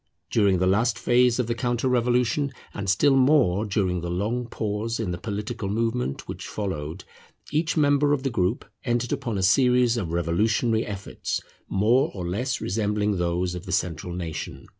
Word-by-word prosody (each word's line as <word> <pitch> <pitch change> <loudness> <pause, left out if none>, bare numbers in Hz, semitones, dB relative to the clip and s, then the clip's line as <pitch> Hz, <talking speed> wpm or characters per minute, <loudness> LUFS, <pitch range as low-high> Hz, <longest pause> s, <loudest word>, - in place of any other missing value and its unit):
During 100 -4 +3
the 90 - +1
last 110 +5 +2
phase 120 0 +3
of 125 - +1
the 115 - -1
counter 120 +1 -1
revolution, 125 +2 +1 0.2
and 100 -2 -4
still 135 +9 +4
more 130 -8 +4
during 95 -4 0
the 85 - -4
long 110 +7 -1
pause 110 +1 -3
in 105 -6 -2
the 85 - -4
political 105 +1 -4
movement 115 - -1
which - - -6
followed, 90 -4 -4 0.5
each 160 +3 0
member 145 -1 +3
of 145 -2 +1
the 135 - -1
group 100 0 0 0.2
entered 120 0 -1
upon 130 -7 -2
a 95 - -1
series 125 +3 +4
of 90 -8 -3
revolutionary 105 +7 +1
efforts 100 -1 -4 0.3
more 120 +9 +3
or 90 -3 -4
less 120 +8 -1
resembling 105 0 0
those 90 +1 0
of 90 +2 -7
the - - -4
central 85 -1 -2
nation. 85 -3 -6
110 Hz, 170 wpm, -25 LUFS, 95-125 Hz, 0.5 s, still